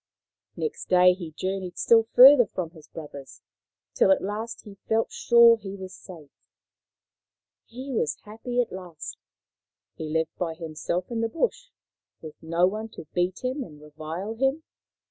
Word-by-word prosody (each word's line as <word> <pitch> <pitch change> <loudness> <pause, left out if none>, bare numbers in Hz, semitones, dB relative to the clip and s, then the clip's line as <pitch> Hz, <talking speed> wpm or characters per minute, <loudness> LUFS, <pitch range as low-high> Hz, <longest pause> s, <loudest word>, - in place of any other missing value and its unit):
Next 455 - -4
day 180 0 +6
he 175 -3 -8
journeyed 185 -1 -4
still 225 -1 +4
further 255 -1 +9
from 175 -4 -5
his 155 -3 -16
brothers, 145 -4 -11 0.5
till - - +3
at 190 - +3
last 215 +4 -5
he 205 -3 -13
felt 225 0 +1
sure 235 -1 +6
he 200 -2 -8
was 190 -1 -9
safe. 165 -7 -13 1.4
He 260 +4 -8
was 155 -10 -1
happy 225 +4 -5
at 240 - -4
last. 180 -4 -8 0.7
He 160 -1 -7
lived 160 0 -1
by 165 -2 -2
himself 165 +4 -4
in 230 -1 -2
the 230 - 0
bush, - - -2 0.5
with 155 -2 -10
no 165 +2 +2
one 215 +4 -2
to - - -8
beat 180 +4 -1
him 260 +2 -2
and 150 -9 -13
revile 155 +7 -6
him. 270 +6 0
190 Hz, 155 wpm, -26 LUFS, 165-230 Hz, 1.4 s, further